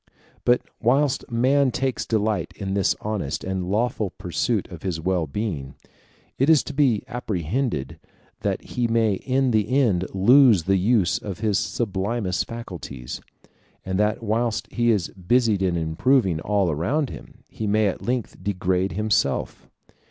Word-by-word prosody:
But 120 0 +3 0.2
whilst 135 +4 +1
man 130 +4 +3
takes 130 0 -2
delight 110 -1 0
in 95 -2 -4
this 100 -1 +2
honest 105 -10 -3
and 95 -1 -3
lawful 110 0 0
pursuit 105 +3 -2
of 85 -3 -9
his 90 -4 -3
wellbeing, 85 -3 -2 0.6
it 135 +4 +3
is 160 -3 +6
to - - -7
be 135 -7 +2
apprehended 105 - -2 0.4
that - - -2
he 120 -1 -1
may 115 -2 +2
in 130 +5 0
the 110 -1 +1
end 115 -10 +2
lose 115 - +6
the 95 +3 +2
use 100 -1 +2
of 100 -1 -7
his 105 -3 +2
sublimest 100 -2 -2
faculties; 90 - -7 0.6
and 95 +1 -1
that 105 +2 +1
whilst 115 +1 -1
he 120 0 +1
is 100 -6 +1
busied 105 +2 +1
in 90 -3 +1
improving 85 - +2
all 100 -1 +1
around 120 - -1
him, - - -12
he 110 - -5
may 105 +1 +3
at 100 - -1
length 125 -2 -3
degrade 95 -2 0
himself. 105 +2 -1
105 Hz, 145 wpm, -24 LUFS, 95-120 Hz, 0.6 s, is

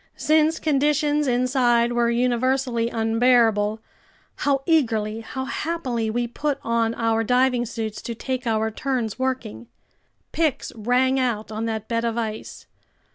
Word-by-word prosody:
Since 315 +1 +3
conditions 295 0 +1
inside 245 -1 +2
were 240 -1 +2
universally 245 0 +1
unbearable, 225 -2 +2 0.6
how 275 -2 0
eagerly, 225 -9 +1
how 260 +4 -5
happily, 265 -7 -2
we 240 +2 -1
put 285 +4 -2
on 230 0 0
our 225 -1 +1
diving 250 +1 +2
suits 220 -2 -5
to 235 - -5
take 255 +1 -4
our 220 0 0
turns 245 -2 -3
working! 255 - -3 0.6
Picks 315 -5 -1
rang 250 +4 +1
out 225 -4 -1
on 220 +1 -3
that 220 -1 -3
bed 230 -1 -1
of 230 0 -1
ice. 220 -2 -5
240 Hz, 130 wpm, -23 LUFS, 225-265 Hz, 0.6 s, Since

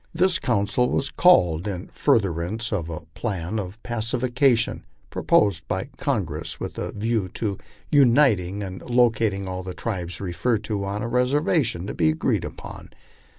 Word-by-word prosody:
This 185 +1 +3
council 120 +1 +1
was 135 - -1
called 90 - +4
in 95 -1 -4
furtherance 110 - 0
of 85 -5 -2
a 80 - -5
plan 100 -1 -3
of 95 +1 -6
pacification 120 +2 +1 0.3
proposed 95 -7 +2
by - - -3
Congress - - -2
with - - -5
a - - -3
view 110 -1 -1
to 100 -4 -2 0.3
uniting 115 - +4
and 95 -1 -7
locat 120 -3 +2
ing 100 0 -5
all 95 0 -4
the 90 0 -7
tribes 90 -6 -4
referred 100 +5 -1
to 105 -2 -2
on 100 +4 -3
a - - -2
reservation 125 - +1
to 105 - -4
be 80 -2 +2
agreed 80 - 0
upon. - - -9
105 Hz, 150 wpm, -24 LUFS, 95-120 Hz, 0.3 s, called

